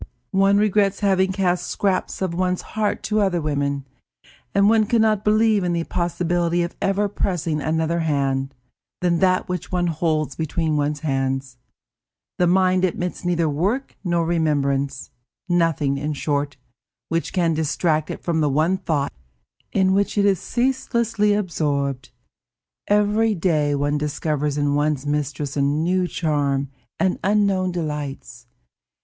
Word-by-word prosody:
One 195 Hz, +1 st, +4 dB
regrets 205 Hz, -1 st, +2 dB
having 190 Hz, -2 st, +2 dB
cast 180 Hz, -2 st, 0 dB
scraps 190 Hz, -1 st, -1 dB
of 185 Hz, -3 st, -1 dB
one's 180 Hz, +1 st, -1 dB
heart 210 Hz, -1 st, -1 dB
to 215 Hz, 0 st, 0 dB
other 190 Hz, -3 st, +1 dB
women, 140 Hz, -2 st, -1 dB, 0.7 s
and 200 Hz, 0 st, +3 dB
one 215 Hz, -1 st, +4 dB
can 235 Hz, +1 st, +2 dB
not 215 Hz, -2 st, +2 dB
believe 215 Hz, -1 st, +3 dB
in 175 Hz, -1 st, 0 dB
the 170 Hz, -1 st, 0 dB
possibility 175 Hz, 0 st, 0 dB
of 170 Hz, -, -5 dB
ever 200 Hz, +1 st, +1 dB
pressing 175 Hz, -6 st, -2 dB
another 160 Hz, +3 st, 0 dB
hand 140 Hz, -3 st, -1 dB, 0.5 s
than 175 Hz, -2 st, +2 dB
that 185 Hz, -1 st, +2 dB
which 180 Hz, -2 st, -4 dB
one 180 Hz, -1 st, +1 dB
holds 155 Hz, -3 st, -1 dB
between 160 Hz, 0 st, -1 dB
one's 145 Hz, 0 st, -1 dB
hands. 135 Hz, -3 st, -2 dB, 0.8 s
The 180 Hz, -, +4 dB
mind 185 Hz, 0 st, +3 dB
admits 180 Hz, 0 st, -2 dB
neither 170 Hz, -2 st, +1 dB
work 195 Hz, -, -1 dB
nor 170 Hz, -3 st, +1 dB
remembrance; 140 Hz, -5 st, 0 dB, 0.4 s
nothing, 165 Hz, -6 st, +1 dB
in 150 Hz, +2 st, -2 dB
short, 145 Hz, -1 st, -2 dB, 0.5 s
which 165 Hz, 0 st, -1 dB
can 170 Hz, -3 st, +1 dB
distract 155 Hz, 0 st, 0 dB
it -, -, -6 dB
from 165 Hz, -2 st, 0 dB
the 150 Hz, -, +2 dB
one 155 Hz, +7 st, +2 dB
thought 150 Hz, -6 st, -1 dB, 0.6 s
in 190 Hz, -1 st, +2 dB
which 200 Hz, +2 st, 0 dB
it 200 Hz, -, +4 dB
is 195 Hz, -3 st, +3 dB
ceaselessly 235 Hz, -4 st, 0 dB
absorbed. 140 Hz, -9 st, -1 dB, 0.8 s
Every 210 Hz, +1 st, +2 dB
day 155 Hz, -5 st, +1 dB
one 145 Hz, +1 st, 0 dB
discovers 150 Hz, -1 st, -1 dB
in 145 Hz, -1 st, +1 dB
one's 145 Hz, -1 st, 0 dB
mistress 145 Hz, -1 st, -2 dB
a 140 Hz, -, +1 dB
new 165 Hz, +6 st, +1 dB
charm 140 Hz, -5 st, -1 dB, 0.3 s
and 190 Hz, -1 st, +1 dB
unknown 195 Hz, -2 st, +2 dB
delights. 145 Hz, -7 st, -5 dB
170 Hz, 145 wpm, -22 LUFS, 145-190 Hz, 0.8 s, One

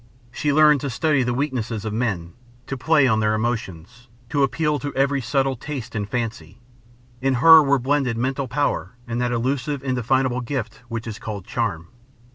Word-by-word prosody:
She 145 Hz, +4 st, -1 dB
learned 150 Hz, -1 st, +5 dB
to 140 Hz, -, -2 dB
study 135 Hz, +3 st, +1 dB
the 125 Hz, 0 st, 0 dB
weaknesses 120 Hz, -5 st, -2 dB
of 110 Hz, -, -3 dB
men, 100 Hz, -8 st, -2 dB, 0.3 s
to 135 Hz, -, -4 dB
play 145 Hz, +2 st, +3 dB
on 110 Hz, -4 st, +3 dB
their 110 Hz, 0 st, +2 dB
emotions, 115 Hz, 0 st, -4 dB, 0.2 s
to 145 Hz, +2 st, 0 dB
appeal 150 Hz, +2 st, +1 dB
to 145 Hz, +3 st, -4 dB
every 140 Hz, +1 st, +1 dB
subtle 135 Hz, +2 st, 0 dB
taste 135 Hz, -1 st, -6 dB
and 105 Hz, -2 st, -3 dB
fancy. 110 Hz, -8 st, -4 dB, 0.6 s
In 135 Hz, 0 st, +1 dB
her 160 Hz, +5 st, +8 dB
were 140 Hz, -1 st, +3 dB
blended 130 Hz, -2 st, 0 dB
mental 130 Hz, +3 st, -1 dB
power 115 Hz, -, -1 dB
and 120 Hz, +1 st, -2 dB
that 125 Hz, 0 st, 0 dB
illusive, 130 Hz, +3 st, -1 dB
indefinable 130 Hz, 0 st, 0 dB
gift 120 Hz, -3 st, -4 dB
which 115 Hz, -1 st, -5 dB
is 110 Hz, -2 st, -6 dB
called 105 Hz, -5 st, -6 dB
charm. 95 Hz, -8 st, -3 dB
125 Hz, 175 wpm, -22 LUFS, 115-140 Hz, 0.6 s, her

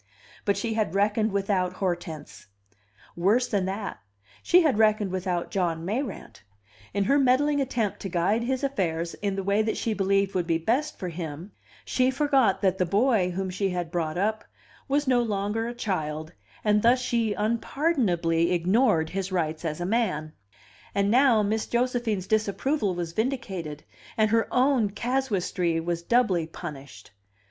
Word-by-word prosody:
But 200 Hz, -1 st, +1 dB
she 225 Hz, +3 st, -2 dB
had 215 Hz, -3 st, -1 dB
reckoned 210 Hz, +2 st, +2 dB
without 195 Hz, -2 st, 0 dB
Hortense; 175 Hz, -, -4 dB, 0.7 s
worse 210 Hz, +9 st, +2 dB
than 200 Hz, -4 st, 0 dB
that, 195 Hz, -, -4 dB, 0.4 s
she 360 Hz, +1 st, +5 dB
had 270 Hz, -9 st, +2 dB
reckoned 215 Hz, -3 st, +3 dB
without 180 Hz, -2 st, -2 dB
John 170 Hz, -4 st, -1 dB
Mayrant; 225 Hz, +3 st, -4 dB, 0.5 s
in 200 Hz, 0 st, 0 dB
her 275 Hz, +8 st, +3 dB
meddling 280 Hz, +2 st, +3 dB
attempt 230 Hz, -6 st, -1 dB
to 195 Hz, -, -5 dB
guide 185 Hz, +6 st, +1 dB
his 260 Hz, +3 st, -2 dB
affairs 170 Hz, -11 st, -1 dB
in 200 Hz, -1 st, -3 dB
the 195 Hz, -, -3 dB
way 200 Hz, +2 st, +2 dB
that 220 Hz, 0 st, -1 dB
she 225 Hz, -, -1 dB
believed 195 Hz, -1 st, +1 dB
would 180 Hz, -2 st, -1 dB
be 165 Hz, -1 st, +2 dB
best 250 Hz, -, -1 dB
for 185 Hz, -, -4 dB
him, 165 Hz, +2 st, -6 dB, 0.3 s
she 255 Hz, 0 st, +2 dB
forgot 270 Hz, -7 st, +2 dB
that 190 Hz, -1 st, +2 dB
the 180 Hz, -, +3 dB
boy 205 Hz, -1 st, +2 dB
whom 190 Hz, +1 st, -3 dB
she 195 Hz, +1 st, -1 dB
had 175 Hz, -2 st, -3 dB
brought 165 Hz, -2 st, -2 dB
up 215 Hz, +3 st, 0 dB, 0.4 s
was 285 Hz, +1 st, +1 dB
no 250 Hz, -2 st, +4 dB
longer 210 Hz, 0 st, -1 dB
a 240 Hz, -, -4 dB
child, 160 Hz, -7 st, -3 dB, 0.3 s
and 210 Hz, -1 st, +3 dB
thus 240 Hz, +3 st, +4 dB
she 235 Hz, -4 st, 0 dB
unpardonably 210 Hz, -, +1 dB
ignored 180 Hz, -2 st, +2 dB
his 195 Hz, 0 st, -3 dB
rights 160 Hz, -3 st, -1 dB
as 155 Hz, -1 st, -3 dB
a 175 Hz, -, -2 dB
man. 185 Hz, -8 st, -1 dB, 0.6 s
And 200 Hz, 0 st, +2 dB
now 245 Hz, -3 st, +5 dB
Miss 215 Hz, +2 st, -1 dB
Josephine's 240 Hz, -5 st, 0 dB
disapproval 215 Hz, +1 st, 0 dB
was 170 Hz, -2 st, -4 dB
vindicated, 190 Hz, -, -3 dB, 0.3 s
and 215 Hz, -1 st, +3 dB
her 225 Hz, 0 st, +2 dB
own 250 Hz, -4 st, +3 dB
casuistry 200 Hz, -8 st, -1 dB
was 170 Hz, 0 st, -2 dB
doubly 190 Hz, -5 st, +2 dB
punished. 140 Hz, -, -9 dB
200 Hz, 160 wpm, -26 LUFS, 175-235 Hz, 0.7 s, she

